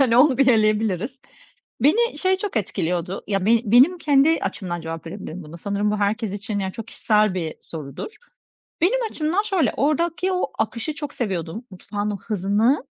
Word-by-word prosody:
Hani, 240 -3 +4
onu 260 0 +5
bir 275 - +5
eleyebiliriz. 215 +1 +2 0.6
Beni 465 - +3
şey 375 0 +2
çok 390 - -5
etkiliyordu, 180 -2 -2
ya, 195 -1 0
ben 230 0 +5
benim 255 - +5
kendi 300 +1 +4
açımdan 175 -4 -3
cevap 165 0 -6
verebilirim 185 -1 -7
buna. 155 +3 -10
Sanırım 200 +3 -1
bu 210 - 0
herkes 210 0 0
için, 205 +1 -4
yani, 190 -1 -2
çok 225 -1 -7
kişisel 210 -3 +2
bir 165 -4 -3
sorudur. 155 - -8 0.7
Benim 435 +9 +3
açımdan 330 +6 0
şöyle, 380 - +1
oradaki 335 +5 +1
o 365 - -1
akışı 245 +7 -2
çok 295 -2 -6
seviyordum, 190 -1 -3
mutfağın 205 +2 -4
o 205 - -2
hızını 215 - +1
220 Hz, 165 wpm, -23 LUFS, 195-290 Hz, 0.7 s, onu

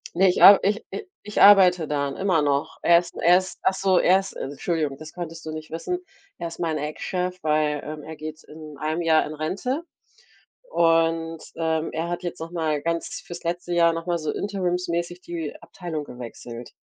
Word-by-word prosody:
Ne, 190 +2 +5
ich - - 0
ar 200 0 +10
ich 205 +2 +1
i 420 - -5 0.2
ich 210 - -2
arbeite 180 -5 +7
da 145 -1 0
n 135 - -5
immer 185 -5 +2
noch. 140 -1 -1
Er 170 0 +6
ist 175 - -9
er 175 +1 +6
ist 185 0 -4
ach 190 - +2
so, 190 -1 +3
er 190 +2 +5
ist 195 - -7
Entschuldigung, 145 0 -3
das 155 0 -11
konntest 165 -2 -7
du 155 - -4
nicht 155 0 -7
wissen, 260 - -3 0.4
er 170 - -3
ist 165 - -9
mein 160 -3 -1
Ex-Chef, 180 +4 -3
weil, 150 -1 +1
ähm, 150 0 -6
er 160 0 -8
geht 155 +1 -8
in 155 -2 -11
1 155 +3 -1
Jahr 160 -1 +4
in 150 - -6
Rente 225 - -2 0.9
und, 165 -1 +2
ähm, 160 -1 0
er 165 +2 -2
hat 175 +1 -4
jetzt 175 - -5
noch 165 +1 -6
mal 155 -4 -1
ganz 170 0 -3
fürs 175 0 -8
letzte 175 +1 -3
Jahr 170 -1 +4
noch 165 +1 -5
mal 175 -1 +1
so 155 - -2
interimsmäßig 180 -3 -2
die 165 -4 -5
Abteilung 160 -5 -6
gewechselt. 120 -1 -9
165 Hz, 200 wpm, -24 LUFS, 155-180 Hz, 0.9 s, ar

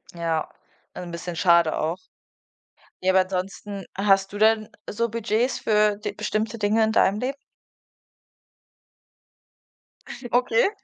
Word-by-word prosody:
Ja, 165 -2 -1 0.5
also, 180 - -7
'n - - -8
bisschen 170 +1 -6
schade 170 -2 +4
auch. 160 +3 -1 1.1
Ja, 190 - +4
aber 190 - +4
ansonsten 195 +2 -5
hast 195 -1 +2
du 205 - -6
denn 215 0 +3 0.2
so 235 +3 -1
Budgets 230 +2 -1
für 210 -1 +2
d 210 - -5
bestimmte 215 +1 -2
Dinge 215 +1 +2
in 220 - -1
deinem 200 -1 +3
Leben? 265 +3 -2 3.0
Okay. 245 +3 +3
205 Hz, 120 wpm, -24 LUFS, 185-220 Hz, 3.0 s, schade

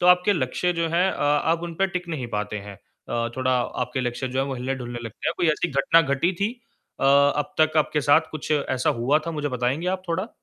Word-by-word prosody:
तो 175 - +2
आपके 180 +3 +5
लक्ष्य 170 +3 0
जो 165 -1 -1
हैं 175 +3 +2
अ, - - -5
आप 150 +3 +2
उन 170 -1 -5
पे 195 +4 +2
टिक 180 -1 -5
नहीं 140 -7 -3
पाते 105 0 -3
हैं 100 0 -9 0.3
अ, 115 0 -1
थोड़ा 130 0 0 0.3
आपके 125 +2 -3
लक्ष्य 125 +1 -2
जो 130 - -3
हैं, 135 - 0
वो 135 - -3
हिलने-डुलने 125 -1 -4
लगते 115 -3 -4
हैं, - - 0
कोई 175 - +1
ऐसी 175 - -1
घटना 140 +3 +4
घटी 140 +5 +1
थी 205 +3 +1 0.5
अ, - - 0
अब 140 +1 +3
तक 155 0 +3
आपके 150 0 +2
साथ 150 +3 +3
कुछ 155 0 -7
ऐसा 130 -3 +1
हुआ 140 +6 +3
था - - -1
मुझे 150 -2 -2
बताएँगे 130 +6 -1
आप 185 - -20
थोड़ा? 185 +6 -1
145 Hz, 235 wpm, -24 LUFS, 130-170 Hz, 0.5 s, आपके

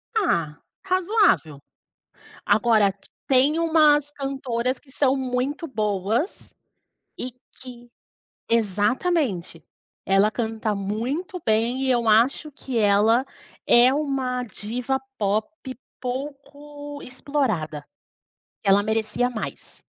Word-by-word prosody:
Ah, 165 - 0 0.3
razoável. 370 - +2 0.9
Agora, 215 -1 +3 0.3
tem 275 +4 +4
umas 305 -3 +4
cantoras 265 -3 -2
que 265 - -22
são 275 0 +2
muito 260 +5 -2
boas 215 - -2 0.7
e 255 - -4 0.3
que 245 -2 -11 0.6
exatamente, 215 - 0 0.4
ela 195 +2 +3
canta 220 -2 -2
muito 255 - -3
bem 230 +4 +1
e 260 - +2
eu 235 -2 +1
acho 245 +7 +3
que 260 -3 -5
ela 215 +4 +4 0.4
é 245 +2 +6
uma 265 -4 -1
diva 245 +4 -3 0.2
pop 210 +1 0 0.5
pouco 285 +2 -7
explorada, 220 - -2 0.8
ela 200 0 +4
merecia 220 +3 0
mais. 225 -3 -8
250 Hz, 95 wpm, -24 LUFS, 215-280 Hz, 0.9 s, é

